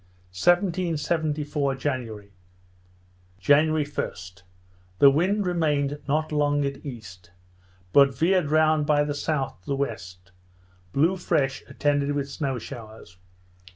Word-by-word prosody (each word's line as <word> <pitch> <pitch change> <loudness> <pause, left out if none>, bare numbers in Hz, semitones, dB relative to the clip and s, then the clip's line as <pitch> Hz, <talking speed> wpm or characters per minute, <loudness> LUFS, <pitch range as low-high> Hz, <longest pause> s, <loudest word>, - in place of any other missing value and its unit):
1774 155 - 0
January 115 -8 -4 1.0
January 150 +7 +3
1st, 95 -10 -6 0.6
the 140 +5 +7
wind 190 +8 +1
remained 150 -5 0
not 155 +2 0
long 145 -1 +1
at 140 0 -5
east, 105 - -10 0.6
but 140 -1 +6
veered 180 -2 +2
round 155 -1 +3
by 145 0 +3
the 145 0 -2
south 145 - -2
to - - -28
the 140 - 0
west; 95 -9 -5 0.6
blew 165 - +2
fresh, 145 -7 0
attended 145 -1 0
with 140 -1 -2
snow 140 -2 -3
showers. 110 -6 -10
145 Hz, 115 wpm, -25 LUFS, 130-155 Hz, 1.0 s, the